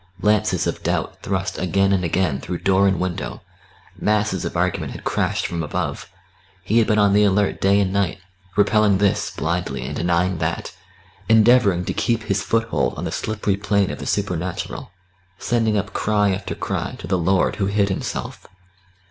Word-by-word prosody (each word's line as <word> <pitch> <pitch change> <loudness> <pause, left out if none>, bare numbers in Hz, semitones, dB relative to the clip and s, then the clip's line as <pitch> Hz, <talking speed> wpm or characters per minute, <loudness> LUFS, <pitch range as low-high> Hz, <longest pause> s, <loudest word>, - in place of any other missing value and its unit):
Lances 105 -3 +2
of - - -3
doubt - - -2
thrust 95 0 -2
again 95 +2 +2
and 95 -2 +1
again 85 -4 0
through 90 +5 -4
door 95 +1 +3
and 95 -3 +1
window; 90 -1 -4 0.6
masses 105 -3 +1
of - - -3
argument - - -1
had - - -9
crashed - - 0
from 85 -1 -3
above; 75 -2 -3 0.5
he 110 +5 +2
had 115 - +2
been 105 - +2
on 100 -1 +4
the 105 +1 +5
alert 100 0 +1
day 100 +1 +4
and 95 -2 0
night, 100 -4 0 0.4
repelling 105 0 +4
this, 100 0 +1
blindly, 80 -6 -3
and 75 +3 -5
denying 90 +1 0
that, 80 +2 -3 0.5
endeavouring 110 -5 +5
to - - -2
keep 115 -2 0
his 100 -2 0
foothold 115 +2 0
on - - -4
the - - -3
slippery 105 -2 -1
plane 100 -1 +1
of - - -7
the - - -6
supernatural, 95 -1 -3 0.5
sending 110 -1 +1
up 100 0 -3
cry 105 -2 +1
after 95 +1 -4
cry - - -3
to - - -8
the 95 - 0
Lord 95 +2 +1
Who 95 - 0
hid 100 0 +1
Himself. 95 - -4
100 Hz, 175 wpm, -21 LUFS, 90-105 Hz, 0.6 s, the